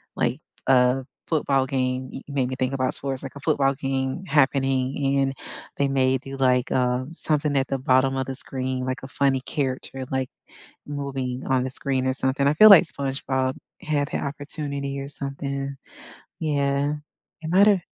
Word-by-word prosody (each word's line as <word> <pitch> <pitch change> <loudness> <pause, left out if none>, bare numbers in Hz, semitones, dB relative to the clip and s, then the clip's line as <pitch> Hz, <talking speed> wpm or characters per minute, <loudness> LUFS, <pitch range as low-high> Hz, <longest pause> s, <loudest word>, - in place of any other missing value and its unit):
like, - - 0 0.3
a 125 0 +4 0.2
football 140 -4 +2
game 130 -1 -1
you - - -6
made 135 -3 0
me 130 - -3
think 130 +1 0
about 130 -1 0
sports, 135 -1 -4
like, 135 - -7
a - - -8
football 140 -2 +2
game 135 +5 -2
happening, 135 -2 +2
and 135 0 +1 0.4
they 140 - +2
may 130 -1 +2
do, 135 +1 -8
like, 130 -1 +2
uh, 125 0 +1
something 150 -3 0
at 135 0 +1
the 135 - 0
bottom 130 +1 +3
of 130 - -1
the 135 - -4
screen, 130 -1 -3
like 130 0 -3
a - - -6
funny 135 -1 +1
character, 135 -1 -3
like, 130 -1 -1 0.6
moving 135 -3 -3
on 130 -1 +2
the 130 - -2
screen 130 -1 -1
or 130 - +2
something; 130 +1 0
I 145 - +4
feel 215 +7 +9
like 190 -3 +9
SpongeBob 135 -2 -2 0.3
had 145 -2 0
ha - - -2
opportunity 140 -1 -4
or 135 - -5
something. 140 0 -4 0.7
Yeah, 145 -1 +1 0.5
it 160 - -4
might've 195 0 +5
135 Hz, 170 wpm, -24 LUFS, 130-140 Hz, 0.7 s, feel